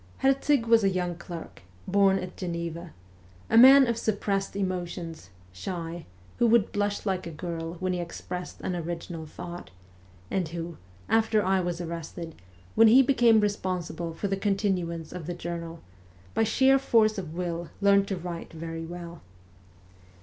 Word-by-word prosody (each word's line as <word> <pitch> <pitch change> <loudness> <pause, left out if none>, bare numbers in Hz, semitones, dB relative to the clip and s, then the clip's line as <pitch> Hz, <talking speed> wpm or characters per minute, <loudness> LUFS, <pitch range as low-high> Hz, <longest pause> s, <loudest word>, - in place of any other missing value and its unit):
Herzig 270 -1 +3
was 230 -1 +5
a 195 - +4
young 180 -2 -1
clerk, 165 - -9 0.3
born 195 -1 +4
at 185 -1 -6
Geneva; 170 -1 -5 0.6
a - - +3
man 265 +3 +9
of 235 -1 -1
suppressed 200 -3 -1
emotions, 175 - -4 0.2
shy, 170 - -5 0.3
who 240 - +5
would 230 -3 +4
blush 205 0 -1
like 190 -3 -1
a - - -6
girl 165 +1 -5
when 185 +1 -2
he 180 - -2
expressed 175 +1 -6
an 180 - -2
original 165 -1 -5
thought, 175 +3 -8 0.6
and 185 -3 0
who, 165 0 -6 0.3
after 220 -2 +2
I 190 0 +3
was 175 -1 -2
arrested, 165 -1 -6 0.4
when 225 0 +7
he 255 +5 +7
became 240 -4 +5
responsible 180 -5 -2
for 200 - -2
the 195 - 0
continuance 190 -5 -1
of 175 -3 -7
the 175 - -3
journal, 170 -1 -6 0.5
by 225 - +2
sheer 265 +5 +4
force 220 -5 +3
of 165 -4 -7
will 170 -1 -3
learned 200 0 +4
to 195 - -2
write 170 -1 -6
very 165 0 -6
well. 170 -1 -8
180 Hz, 155 wpm, -27 LUFS, 170-205 Hz, 0.6 s, man